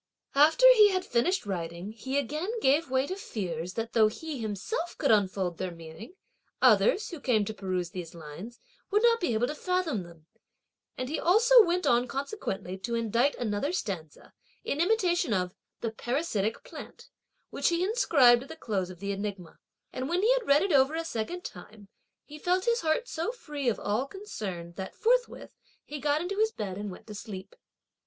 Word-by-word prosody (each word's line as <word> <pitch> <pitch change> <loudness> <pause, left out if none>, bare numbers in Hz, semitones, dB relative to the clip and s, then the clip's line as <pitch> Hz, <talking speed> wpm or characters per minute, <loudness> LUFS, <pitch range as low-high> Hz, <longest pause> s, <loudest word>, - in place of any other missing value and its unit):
After 310 - +5
he 425 -4 +7
had 370 -1 -1
finished 330 - +1
writing, 175 0 -4
he 260 +5 -4
again 300 - -2
gave 285 -2 +2
way 260 +1 +2
to 370 - -4
fears 180 - -5
that 225 0 -4
though 220 -2 +5
he 295 +6 -6
himself 225 - -4
could 280 - +2
unfold 190 -4 +1
their 185 - -2
meaning, 165 - -11 0.4
others, 445 -3 +4
who 335 - -7
came 225 -7 +2
to 220 - -4
peruse 185 -4 -3
these 175 -2 -7
lines, 170 +9 -9 0.3
would 415 +2 +2
not 465 -1 +5
be 245 - 0
able 225 +3 +2
to 295 - -3
fathom 355 - -1
them, 170 -3 -14 0.7
and 255 - -3
he 305 - -2
also 460 +6 +6
went 360 -1 0
on 240 +1 +3
consequently 265 - -4
to 235 +4 -3
indite 230 +4 +1
another 235 +5 -1
stanza, 180 - -5 0.3
in 290 - -1
imitation 350 - +2
of 180 -1 -1 0.3
the 230 - -2
"Parasitic 225 -3 -2
Plant," - - -11 0.4
which - - +1
he 340 +1 +1
inscribed 285 - +5
at 270 - -11
the 320 - -7
close 195 - -2
of 180 -2 -11
the 200 0 -2
enigma; 195 -3 -5 0.3
and 260 +2 -3
when 355 +3 0
he 475 +3 +5
had - - -1
read 285 +4 +5
it 390 - 0
over 275 +1 +4
a 330 0 -2
second 330 +7 -4
time, 200 +3 -11 0.4
he 300 +1 -11
felt 365 +3 +1
his 470 0 +2
heart 320 +10 0
so 335 +2 -2
free 295 - -3
of 230 - -2
all 220 +7 -1
concern 195 - -6
that 190 -1 -6
forthwith 485 +2 0 0.3
he 295 - -6
got 290 +2 +1
into 390 +4 -3
his 440 0 +3
bed, 200 - -5
and 205 +1 -5
went 180 - -11
to 215 - -9
sleep. 200 -2 -8
255 Hz, 190 wpm, -29 LUFS, -, 0.7 s, he